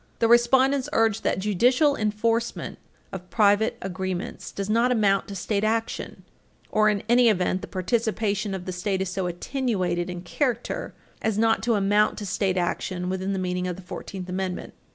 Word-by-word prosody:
The 230 - +2
respondents 260 +4 +4
urge 225 -1 +2
that - - 0
judicial 245 - +3
enforcement 225 +2 -1 0.3
of 185 -1 -8
private 210 0 +3
agreements 190 +2 -4
does 195 -1 -4
not 230 +4 +2
amount 205 -5 +2
to 200 - -7
state 200 +2 -1
action, 225 +1 -2 0.5
or, 215 0 +4
in 205 -2 -1
any 240 0 +5
event, 185 -2 +1
the - - -7
participation 210 0 -1
of 180 -1 -7
the 185 - -3
State 190 +1 -1
is 190 - -4
so 185 -1 -2
attenuated 180 -3 -1
in 180 -1 -5
character 245 - -2 0.3
as 220 -2 0
not 225 0 +3
to 230 -1 +1
amount 205 +1 +2
to 210 - -5
state 190 -1 0
action 180 +1 -2
within 190 +1 -2
the 195 - -1
meaning 180 0 -2
of 180 - -3
the 190 - -11
Fourteenth 185 +1 -7
Amendment. 185 0 -4
205 Hz, 175 wpm, -25 LUFS, 185-225 Hz, 0.5 s, any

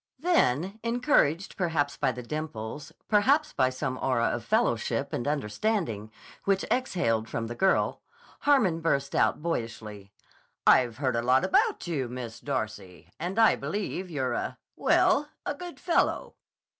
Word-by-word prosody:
Then, 205 - +1
encouraged 230 - +1
perhaps 160 -6 0
by 135 -3 +1
the 125 0 -7
dimples, 145 -2 -5 0.2
perhaps 275 +9 +3
by 130 - +2
some 130 0 -3
aura 120 -3 +1
of - - -3
fellowship - - 0
and 120 - -2
understanding 140 - -1 0.3
which 195 -1 +1
exhaled 115 - 0
from 115 - -3
the 115 - -5
girl, 190 +10 +1 0.4
Hannon 235 - +3
burst 140 -4 0
out - - +2
boyishly: 110 -9 -4 0.5
"I've 120 -3 +5
heard 130 -3 0
a 115 - +1
lot 130 +2 +3
about 425 +3 +2
you, 145 -8 -2
Miss 120 -2 -7
Darcy, 110 -9 -5
and 180 +5 -4
I 225 -1 +6
believe 185 +4 -4
you're 135 -6 -1
a—well, 295 0 +1 0.2
a - - -1
good 350 +4 -9
fellow." 345 - +1
145 Hz, 140 wpm, -28 LUFS, -, 0.5 s, I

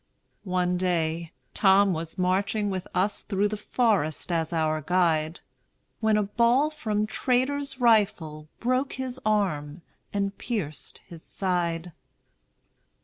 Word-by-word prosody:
One 180 0 +1
day, 170 -2 -1 0.2
Tom 195 -1 +5
was 165 +2 -5
marching 200 +3 +1
with 185 -1 -4
us 200 +3 +1
Through 205 0 0
the 215 - -2
forest 205 - 0
as 165 -1 0
our 155 -2 0
guide, 165 -1 +1 0.6
When 220 -1 +3
a 210 - +2
ball 240 +8 +2
from 215 -9 -1
traitor's 270 +4 0
rifle 195 -10 +2
Broke 255 +3 0
his 260 -1 -4
arm 175 -7 0 0.3
and 200 -1 -1
pierced 190 - -4
his 170 -2 -12
side. 175 -2 -2
190 Hz, 120 wpm, -26 LUFS, 165-220 Hz, 0.6 s, Tom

